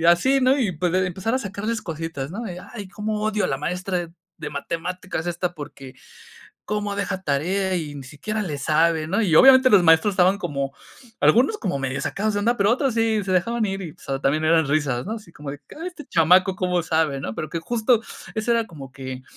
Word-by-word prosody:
y -, -, -2 dB
así, 260 Hz, +11 st, +4 dB
¿no? 260 Hz, +2 st, +4 dB
Y, 210 Hz, -8 st, +1 dB
pues, 175 Hz, +2 st, -1 dB
de 185 Hz, 0 st, +2 dB
empezar 190 Hz, +7 st, -2 dB
a -, -, +2 dB
sacarles 215 Hz, +1 st, -3 dB
cositas, 165 Hz, -4 st, -5 dB
¿no? 220 Hz, +2 st, -5 dB
Y: 175 Hz, -, -7 dB, 0.2 s
"Ay, 205 Hz, -5 st, -7 dB
cómo 210 Hz, +1 st, -3 dB
odio 215 Hz, -1 st, 0 dB
a -, -, 0 dB
la 135 Hz, -, -1 dB
maestra 180 Hz, +2 st, -3 dB, 0.3 s
de 150 Hz, -, -5 dB
matemáticas 170 Hz, +3 st, -4 dB
esta, 175 Hz, +1 st, -2 dB
porque 140 Hz, -3 st, -10 dB, 0.7 s
cómo 210 Hz, -1 st, -2 dB
deja 200 Hz, -2 st, -2 dB
tarea 185 Hz, +6 st, 0 dB
y 150 Hz, -4 st, -4 dB
ni 135 Hz, -, -8 dB
siquiera 210 Hz, +11 st, -4 dB
le 150 Hz, -7 st, -4 dB
sabe", 160 Hz, +2 st, +2 dB
¿no? 200 Hz, +6 st, +1 dB
Y, 170 Hz, -6 st, +2 dB
obviamente, 260 Hz, -1 st, +8 dB
los 200 Hz, -4 st, +6 dB
maestros 165 Hz, +5 st, +5 dB
estaban 185 Hz, +2 st, +4 dB
como, 140 Hz, -7 st, -3 dB, 0.5 s
algunos 265 Hz, -, +4 dB
como 180 Hz, -, -2 dB
medio 135 Hz, 0 st, -2 dB
sacados 215 Hz, +1 st, -1 dB
de 205 Hz, -, 0 dB
onda, 235 Hz, +3 st, +1 dB
pero 200 Hz, +2 st, +3 dB
otros 270 Hz, -1 st, +1 dB
sí, 225 Hz, -2 st, +1 dB
se 190 Hz, -, -2 dB
dejaban 225 Hz, +6 st, +1 dB
ir 195 Hz, 0 st, -3 dB
y, 165 Hz, -, -6 dB
o -, -, -23 dB
sea, 135 Hz, 0 st, -4 dB
también 150 Hz, +3 st, +1 dB
eran 160 Hz, -2 st, +3 dB
risas, 145 Hz, -3 st, 0 dB
¿no? 215 Hz, -, -3 dB
Así 210 Hz, -7 st, -11 dB
como 150 Hz, -2 st, -7 dB
de: 145 Hz, 0 st, -8 dB, 0.2 s
"Ay, 345 Hz, -, -4 dB
este 320 Hz, -5 st, -11 dB
chamaco 180 Hz, +3 st, +4 dB
cómo 180 Hz, -2 st, 0 dB
sabe", 160 Hz, -4 st, 0 dB
¿no? 110 Hz, -5 st, -5 dB
Pero 155 Hz, -, -4 dB
que 165 Hz, -, -3 dB
justo 230 Hz, +4 st, +1 dB, 0.3 s
eso 220 Hz, +2 st, -1 dB
era 230 Hz, -1 st, +1 dB
como 135 Hz, -5 st, -11 dB
que 130 Hz, -1 st, -7 dB
180 Hz, 225 wpm, -23 LUFS, 155-215 Hz, 0.7 s, obviamente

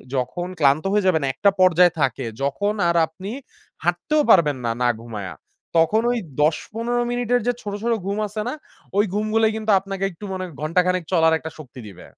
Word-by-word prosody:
যখন 130 Hz, +8 st, -2 dB
ক্লান্ত 140 Hz, +1 st, +3 dB
হয়ে 205 Hz, -1 st, +2 dB
যাবেন 160 Hz, -5 st, +2 dB
একটা 200 Hz, +9 st, +3 dB
পর্যায়ে 180 Hz, -1 st, +5 dB
থাকে 135 Hz, -1 st, 0 dB, 0.2 s
যখন 200 Hz, +10 st, 0 dB, 0.2 s
আর 170 Hz, -, +1 dB
আপনি 185 Hz, +6 st, -8 dB, 0.5 s
হাঁটতেও 305 Hz, -1 st, +1 dB
পারবেন 155 Hz, -9 st, +5 dB
না, 115 Hz, -, +1 dB
না 120 Hz, -, +4 dB
ঘুমায়া। 105 Hz, -5 st, -7 dB, 0.4 s
তখন 185 Hz, +7 st, +4 dB
ওই 245 Hz, -, 0 dB, 0.2 s
১০-১৫ 230 Hz, +10 st, 0 dB
মিনিটের 245 Hz, 0 st, +1 dB
যে 245 Hz, -, +3 dB
ছোট, 205 Hz, -2 st, -5 dB
ছোট 235 Hz, 0 st, +2 dB
ঘুম 200 Hz, +1 st, -2 dB
আছে 215 Hz, +1 st, -5 dB
না? 250 Hz, -, -2 dB, 0.4 s
ঐ 200 Hz, -, +3 dB
ঘুমগুলাই 215 Hz, +1 st, +2 dB
কিন্তু 220 Hz, -1 st, -1 dB
আপনাকে 195 Hz, 0 st, -6 dB
একটু 180 Hz, +4 st, -10 dB
মনে 185 Hz, 0 st, -3 dB, 0.2 s
ঘন্টাখানেক 180 Hz, +3 st, +1 dB
চলার 160 Hz, -3 st, +4 dB
একটা 160 Hz, +1 st, -8 dB
শক্তি 135 Hz, -4 st, -11 dB
দিবে। 95 Hz, -3 st, -12 dB
185 Hz, 175 wpm, -22 LUFS, 155-215 Hz, 0.5 s, পর্যায়ে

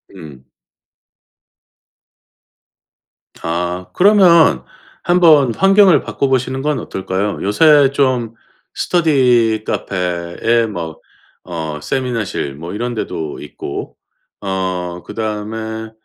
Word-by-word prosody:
음. 65 Hz, -4 st, -13 dB, 3.0 s
아. 90 Hz, +2 st, -3 dB
그러면 175 Hz, -, +5 dB, 0.4 s
1 175 Hz, +1 st, +2 dB
번 145 Hz, -8 st, +5 dB
환경을 195 Hz, -5 st, +5 dB
바꿔 140 Hz, -, -2 dB
보시는 130 Hz, 0 st, -1 dB
건 150 Hz, -1 st, -1 dB
어떨까요? 95 Hz, +2 st, -3 dB
요새 145 Hz, +6 st, +4 dB
좀 125 Hz, -5 st, 0 dB, 0.4 s
스터디 125 Hz, -10 st, +2 dB
카페에 90 Hz, +5 st, -1 dB
뭐 85 Hz, -6 st, -6 dB, 0.5 s
어 80 Hz, -3 st, -5 dB
세미나실 115 Hz, -, -3 dB
뭐 85 Hz, +5 st, -8 dB
이런 120 Hz, +3 st, -3 dB
데도 80 Hz, -8 st, -5 dB
있고 75 Hz, -, -7 dB, 0.5 s
어 90 Hz, -3 st, -3 dB
그다음에 110 Hz, +1 st, -5 dB
110 Hz, 170 characters per minute, -17 LUFS, 90-135 Hz, 3.0 s, 그러면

